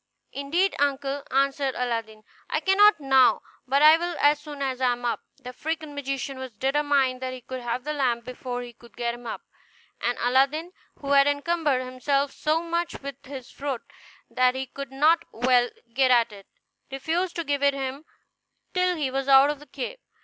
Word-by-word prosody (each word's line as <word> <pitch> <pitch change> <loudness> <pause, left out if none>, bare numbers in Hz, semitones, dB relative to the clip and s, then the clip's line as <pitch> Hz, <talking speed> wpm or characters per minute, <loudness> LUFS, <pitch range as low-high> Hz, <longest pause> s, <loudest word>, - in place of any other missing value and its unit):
"Indeed, 335 +8 0
uncle," 280 0 0
answered 275 0 +1
Aladdin, 230 -3 -3 0.3
"I - - 0
cannot 390 +2 +5
now, 270 -2 +4 0.2
but 275 +3 +3
I 310 +1 +9
will 345 0 -3
as 290 0 +4
soon 295 -1 -9
as 260 -1 -3
I 250 -1 +3
am 245 0 -7
up." 235 - 0 0.2
The 260 -3 -9
African 310 +3 -4
magician 275 -1 -4
was 260 -2 -7
determined 270 -1 +1
that 255 0 -3
he 255 -1 -9
would 260 -1 -5
have 240 +1 -3
the 300 +2 -3
lamp 245 -5 0
before 250 -1 -5
he 240 -1 -11
would 235 -4 -17
help 235 -1 -1
him 240 0 -10
up; - - -6 0.6
and 240 +1 0
Aladdin, 275 +7 +2 0.3
who 280 -1 -3
had 280 0 +6
encumbered 290 -2 +1
himself 275 +2 0
so 315 +2 0
much 340 0 -2
with 280 0 -7
his 265 -3 -8
fruit 275 -4 -4 0.4
that 255 0 +2
he 265 0 -3
could 275 +1 -8
not 310 +5 +3
well 245 +1 +3 0.2
get 260 +1 +3
at 235 -2 +4
it, 200 -2 -13 0.4
refused 335 +7 -2
to 335 - -2
give 285 -2 -1
it 280 0 +3
him 270 +2 -4 0.7
till 365 0 +2
he 290 -5 -2
was 270 0 -2
out 275 +1 +7
of 295 - -7
the 295 - -15
cave. 285 - -6
275 Hz, 190 wpm, -25 LUFS, 255-295 Hz, 0.7 s, I